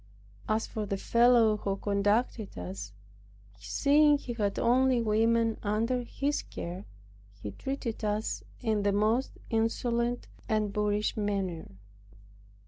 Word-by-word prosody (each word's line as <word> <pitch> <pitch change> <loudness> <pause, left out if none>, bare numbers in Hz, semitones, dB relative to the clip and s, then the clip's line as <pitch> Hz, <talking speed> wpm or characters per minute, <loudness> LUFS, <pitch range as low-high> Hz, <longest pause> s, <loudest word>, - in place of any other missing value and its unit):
As 215 +1 +1
for 215 -2 -4
the 195 - -1
fellow 235 0 +4
who 195 -1 -2
conducted 205 - 0
us, 95 +3 -6 0.7
seeing 290 - +4
he 250 -4 -6
had 205 -4 -1
only 255 +1 +3
women 225 +1 +2
under 225 +4 0
his 280 +4 -2
care, 180 +4 -7 0.5
he 105 - -6
treated 240 - -4
us 210 +1 -1 0.2
in 220 -4 +1
the 200 0 +1
most 220 +6 +1
insolent 235 +1 0 0.2
and 215 -2 0
boorish 210 0 0
manner. 195 -5 -2
220 Hz, 120 wpm, -29 LUFS, 205-240 Hz, 0.7 s, fellow